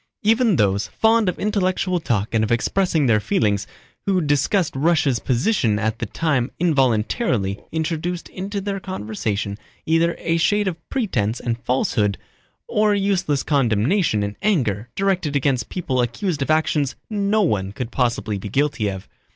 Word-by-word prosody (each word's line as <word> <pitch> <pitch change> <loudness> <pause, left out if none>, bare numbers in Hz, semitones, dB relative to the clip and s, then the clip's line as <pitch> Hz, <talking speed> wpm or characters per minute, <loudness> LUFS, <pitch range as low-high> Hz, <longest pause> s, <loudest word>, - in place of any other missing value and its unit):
Even 225 -1 +3
those, 100 -3 +1
fond 225 - +2
of 180 - -4
intellectual 185 -3 0
talk 110 -9 -1
and 110 -1 +2
of 110 - -1
expressing 160 +5 +1
their 110 -4 +4
feelings, 105 -1 0 0.4
who 190 -2 +3
discussed 150 +3 +1
Russia's 145 -4 +2
position 120 - +1
at 110 +1 -1
the 120 - -3
time 140 -2 0
involuntarily 125 - +1
introduced 165 +2 -2
into 200 +2 -4
their 195 0 -3
conversation 105 - -3 0.3
either 165 +1 +2
a 165 0 0
shade 205 +5 +2
of 165 -3 -5
pretense 120 - -1
and 120 -1 -2
falsehood 110 -5 0 0.5
or 210 -1 +2
useless 190 -8 0
condemnation 125 - +2
and 100 0 -4
anger 120 - 0
directed 190 -7 0
against 135 -2 0
people 135 -8 -1
accused 145 - -2
of 135 - -1
actions 155 -3 +1
no 210 0 +1
one 100 - 0
could 120 +3 -5
possibly 115 -5 -1
be 100 - -6
guilty 135 -3 0
of. 95 -1 -5
145 Hz, 150 wpm, -21 LUFS, -, 0.5 s, their